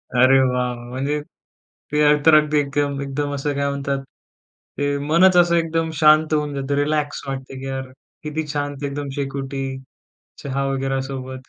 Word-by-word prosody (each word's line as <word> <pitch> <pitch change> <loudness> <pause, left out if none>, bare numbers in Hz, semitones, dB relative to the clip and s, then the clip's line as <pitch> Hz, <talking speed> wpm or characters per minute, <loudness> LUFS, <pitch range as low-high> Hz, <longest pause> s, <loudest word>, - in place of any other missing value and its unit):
अरे 130 +2 +6
वाह, 130 - +3
वाह! 125 -1 0 0.2
म्हणजे 140 +4 -2
ते 150 0 -7 0.2
तर 160 -1 +8
अगदी 150 0 +4
एकदम 140 0 -1
एकदम 145 +1 -3
असं 145 +1 -2
काय 140 0 0
म्हणतात 140 0 -2 0.8
ते 145 0 0
मनच 180 +3 +5
असं 175 -1 +5
एकदम 165 -1 0
शांत 155 +1 +5
होऊन 150 -1 0
जातं, 140 +1 -2
रिलॅक्स 145 0 -1
वाटतं 135 -1 -6
की 135 - -7
यार 130 -1 -4 0.3
किती 150 +1 -3
शांत 145 -1 -4
एकदम 140 0 -4
शेकोटी 135 -1 -3 0.8
चहा 140 0 -2
वगैरा 135 0 -1
सोबत. 130 -1 -7
140 Hz, 155 wpm, -21 LUFS, 135-150 Hz, 0.8 s, तर